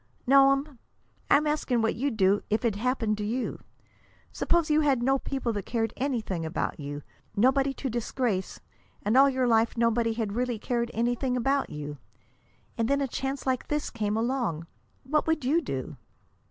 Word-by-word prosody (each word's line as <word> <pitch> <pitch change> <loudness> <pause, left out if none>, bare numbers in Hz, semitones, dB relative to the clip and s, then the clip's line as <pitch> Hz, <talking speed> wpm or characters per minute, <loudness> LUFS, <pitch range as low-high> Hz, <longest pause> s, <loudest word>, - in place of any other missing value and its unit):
"No'm. 275 0 +4 0.5
I'm 300 - +5
asking 280 -6 0
what 225 - +2
you'd 255 -1 -2
do 195 0 +3
if 215 +3 0
it 220 -4 +1
happened 225 -2 0
to - - -2
you. 235 +4 -2 0.7
Suppose 340 -2 +1
you 305 +1 +4
had 270 -5 +2
no 270 +2 +3
people 255 -4 -2
that 205 -3 -5
cared 225 -2 -1
anything 230 - -2
about 160 0 -3
you, 145 0 -6 0.3
nobody 270 +5 +3
to 275 - -4
disgrace, 235 -4 -2 0.4
and 210 +4 +1
all 275 +1 +7
your 260 -1 0
life 230 0 +2
nobody 230 0 +2
had 220 -3 -3
really 245 0 -1
cared 235 +2 -1
anything 245 +2 0
about 270 +3 +1
you. 145 -1 -6 0.8
And 225 - +2
then 280 +2 +2
a 275 - 0
chance 270 +2 -4
like 260 -2 -1
this 295 0 -2
came 215 -2 -1
along. 225 - -1 0.4
What 300 +4 0
would 320 -4 0
you 310 +6 +3
do?" 135 - -5
245 Hz, 170 wpm, -27 LUFS, 220-270 Hz, 0.8 s, all